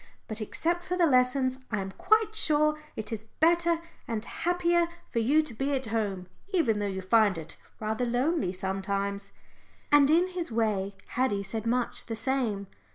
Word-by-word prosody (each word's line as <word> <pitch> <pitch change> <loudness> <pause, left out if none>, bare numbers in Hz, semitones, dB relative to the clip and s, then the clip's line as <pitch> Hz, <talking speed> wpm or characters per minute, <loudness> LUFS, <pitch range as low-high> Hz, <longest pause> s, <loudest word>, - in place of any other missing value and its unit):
But 220 0 -5
except 340 +10 -1
for 360 +1 -2
the 350 - +5
lessons, 255 -1 +3
I 215 - -1
am 195 0 -4
quite 435 - +2
sure 305 -6 +3 0.2
it 220 +2 -5
is 220 -1 -4 0.2
better 340 +1 +4 0.3
and 225 -2 -3
happier 345 -1 +1 0.2
for 235 - 0
you 285 +8 +3
to 305 - -6
be 270 +5 -1
at 265 -1 -1
home, 210 -5 -2 0.3
even 255 - +2
though 205 - -1
you 190 -1 -4
find 205 -1 +4
it 160 -1 -8 0.2
rather 220 +2 -1
lonely 250 - +1
sometimes." 195 +1 -2 0.6
And 290 -1 +6
in 345 +4 +4
his 360 -6 -4
way 205 -3 0
Haddie 225 -6 0
said 220 +3 -4
much 245 +1 0
the 225 - -3
same. 225 -5 -1
235 Hz, 170 wpm, -28 LUFS, 205-310 Hz, 0.6 s, And